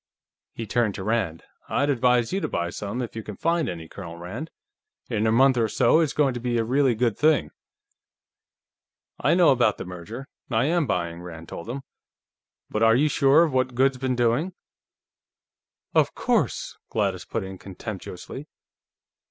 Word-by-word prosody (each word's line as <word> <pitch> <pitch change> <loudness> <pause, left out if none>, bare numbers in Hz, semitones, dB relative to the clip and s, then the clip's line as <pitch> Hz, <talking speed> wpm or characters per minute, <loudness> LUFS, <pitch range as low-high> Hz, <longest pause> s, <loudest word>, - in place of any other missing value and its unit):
He 115 - -4
turned 110 -1 +1
to 95 - -5
Rand. 105 -7 -1 0.3
"I'd 145 0 +2
advise 125 -1 +2
you 195 - 0
to - - -1
buy 85 0 -2
some, 105 +7 -4
if 115 - -7
you 110 - -3
can 105 -1 -8
find 165 -4 +1
any, 85 -2 -6
Colonel 85 -2 -9
Rand. 105 - -6 0.6
In 110 -1 +1
a - - +3
month 130 +3 +5
or 115 -2 +3
so, 155 - +4
it's 160 -4 +2
going 140 -3 +2
to 120 - -4
be 120 0 -1
a 115 - +2
really 130 +1 +2
good 115 -1 +1
thing." 155 0 +2 1.7
"I - - +3
know 180 -1 +6
about 120 -5 +3
the - - -6
merger. 90 +9 -8 0.2
I 115 0 +2
am 165 -1 +1
buying," 85 -3 -2
Rand 85 -2 -9
told 85 - -7
him. 135 +3 -4 0.8
"But 110 - -3
are 115 0 +6
you 150 +5 +3
sure 140 +3 +5
of 160 -5 0
what 130 -1 +1
Goode's 130 0 +2
been 130 -1 0
doing?" 120 +9 +1 1.4
"Of - - +3
course," - - 0
Gladys 100 -4 -1
put 115 - -3
in 95 -1 -8
contemptuously. 100 - -8
120 Hz, 175 wpm, -25 LUFS, 100-135 Hz, 1.7 s, know